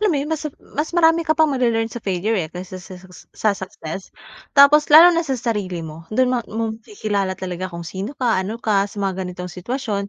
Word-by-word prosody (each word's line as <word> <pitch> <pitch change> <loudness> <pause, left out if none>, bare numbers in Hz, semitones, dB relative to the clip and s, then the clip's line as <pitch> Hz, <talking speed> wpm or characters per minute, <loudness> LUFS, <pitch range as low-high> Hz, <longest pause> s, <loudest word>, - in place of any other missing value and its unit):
alam 425 - +3
mo 330 - +1
'yon, 285 +2 -3
mas 305 -1 -2 0.2
mas 300 +2 -1
marami 325 0 +5
ka 315 -2 0
pang 315 -2 +3
male-learn 230 -3 0
sa 240 - -6
failure 195 +1 -1
eh, 155 - -4
kaysa 185 +2 -8
sa 185 0 -11
sa 185 +1 -15 0.3
sa 215 - +1
success. 190 -2 -7 0.5
Tapos 290 +2 +7
lalo 330 +4 +9
na 335 - +2
sa 270 -6 -2
sarili 205 -8 -3
mo, 160 +1 -10
do'n 255 +4 +2
ma 250 - +1
mo-makikilala 215 - -3
talaga 185 0 -5
kung 170 -1 -8
sino 195 - -6
ka? 235 -7 +1
Ano 200 +4 -4
ka 205 -3 +1
sa 205 - -15
mga 190 -1 -2
ganitong 180 -1 -7
sitwasyon 200 +1 -3
215 Hz, 215 wpm, -21 LUFS, 185-280 Hz, 0.5 s, lalo